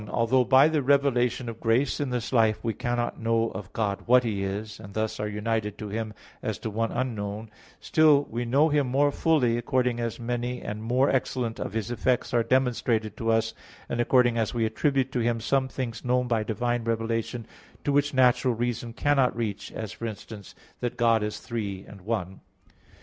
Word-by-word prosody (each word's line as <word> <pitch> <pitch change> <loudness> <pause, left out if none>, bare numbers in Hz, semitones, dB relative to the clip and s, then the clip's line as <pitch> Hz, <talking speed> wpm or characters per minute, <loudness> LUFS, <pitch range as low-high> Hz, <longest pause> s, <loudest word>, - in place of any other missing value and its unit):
1: 105 - -10
Although 125 +2 +2
by 130 +4 +6
the 155 -2 +1
revelation 130 -3 +2
of 115 -1 -6
grace 120 +4 +1
in 145 -2 -1
this 125 0 -3
life 110 -3 +4
we 115 - 0
cannot 120 +2 -2
know 115 0 +1
of 95 -3 -8
God 100 -3 -1
"what 125 +1 +6
He 105 -4 -2
is," 105 +2 -4
and 100 -2 -11
thus 110 0 -2
are 105 - -1
united 105 0 -2
to 105 - -6
Him 110 0 -4 0.3
as - - -3
to 110 - -5
one 115 +2 -1
unknown; 110 -3 -3 0.3
still 155 -3 +4
we 120 +2 -2
know 140 +7 +3
Him 145 -3 +2
more 140 +3 +2
fully 135 -7 +2
according 125 0 0
as 115 -1 -3
many 120 +1 -2
and 105 +1 -5
more 125 +5 +2
excellent 125 -3 -1
of - - -4
His 110 +1 -2
effects 120 +1 0
are 120 - +4
demonstrated 115 -4 +1
to 115 - -2
us, 115 0 +2 0.3
and 120 - -1
according 120 -1 +3
as 110 +1 -1
we 115 -1 +1
attribute 135 +4 0
to 125 - -1
Him 115 0 +1
some 130 +4 +1
things 120 -4 -5
known 125 0 +1
by 115 -2 +1
divine 120 +2 -1
revelation, 115 +1 -2 0.4
to 145 - 0
which 145 +1 +2
natural 125 -1 +3
reason 120 0 -2
cannot 135 -1 +2
reach, 110 -4 -3
as, 110 -2 -5
for 115 - -5
instance, 105 -2 -9 0.2
that 120 - -3
God 115 -2 +3
is 105 0 -3
Three 100 -5 -5
and 100 -2 -12
One. 95 -2 -3
115 Hz, 195 wpm, -26 LUFS, 110-125 Hz, 0.4 s, by